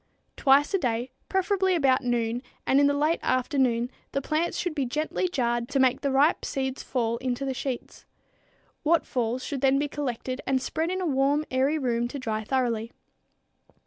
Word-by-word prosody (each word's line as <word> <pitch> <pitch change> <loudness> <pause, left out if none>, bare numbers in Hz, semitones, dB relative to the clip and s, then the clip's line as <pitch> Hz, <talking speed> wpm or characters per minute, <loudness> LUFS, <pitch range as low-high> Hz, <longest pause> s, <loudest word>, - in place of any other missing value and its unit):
Twice 280 +3 +4
a 390 - +3
day, 245 -2 -1 0.2
preferably 380 -1 +2
about 270 -5 +3
noon, 240 -1 0 0.2
and 270 - +4
in 285 - +5
the 285 - +2
late 305 +3 +1
afternoon 255 -2 +1 0.2
the 275 - 0
plants 315 +4 0
should 355 -3 -2
be 285 -3 -1
gently 305 +8 -1
jarred 240 -7 -1
to 275 - 0
make 260 -1 +3
the 280 - 0
ripe 275 +4 +3
seeds 265 -1 -2
fall 235 -2 -1
into 250 +2 -2
the 265 - -1
sheets. 255 -1 -5 0.8
What 325 +1 +2
falls 245 +1 -1
should 280 -3 -4
then 270 0 +4
be 290 +1 0
collected 260 -2 -4
and 265 -1 +2
spread 320 +5 -2
in 370 +1 -2
a - - -1
warm, 285 0 +2
airy 265 +4 +2
room 240 -4 0
to 265 - -6
dry 220 -4 -3
thoroughly. 235 -2 -1
265 Hz, 180 wpm, -26 LUFS, 245-295 Hz, 0.8 s, in